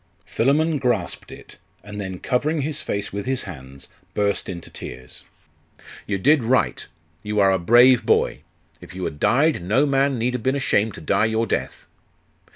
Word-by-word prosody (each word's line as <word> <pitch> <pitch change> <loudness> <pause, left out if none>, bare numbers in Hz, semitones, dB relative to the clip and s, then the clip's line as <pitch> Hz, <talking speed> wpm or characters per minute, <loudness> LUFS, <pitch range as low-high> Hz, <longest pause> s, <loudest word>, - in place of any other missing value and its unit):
Philammon 150 +5 +1
grasped 120 -9 -2
it, - - -13 0.3
and 105 0 -7
then 95 -2 -5
covering 145 - -1
his 150 +1 -3
face 100 -1 -4
with 100 +3 -5
his 130 -1 -1
hands, 70 -7 -11 0.3
burst 100 -1 0
into 85 -2 -8
tears. 65 0 -10 0.8
'You 100 - -1
did 140 +6 +3
right. 125 +3 0 0.3
You 105 +1 -2
are 100 -1 +5
a 95 - +1
brave 120 +7 +5
boy. - - +1 0.4
If - - -12
you 95 - -5
had 75 - -4
died, 145 - +2
no 110 +11 +2
man 135 -1 +1
need 120 +2 -1
have 125 - -3
been 130 +4 0
ashamed 110 -6 +1
to - - -10
die 100 +6 +1
your 110 +1 0
death. - - -3
110 Hz, 170 wpm, -22 LUFS, 95-135 Hz, 0.8 s, are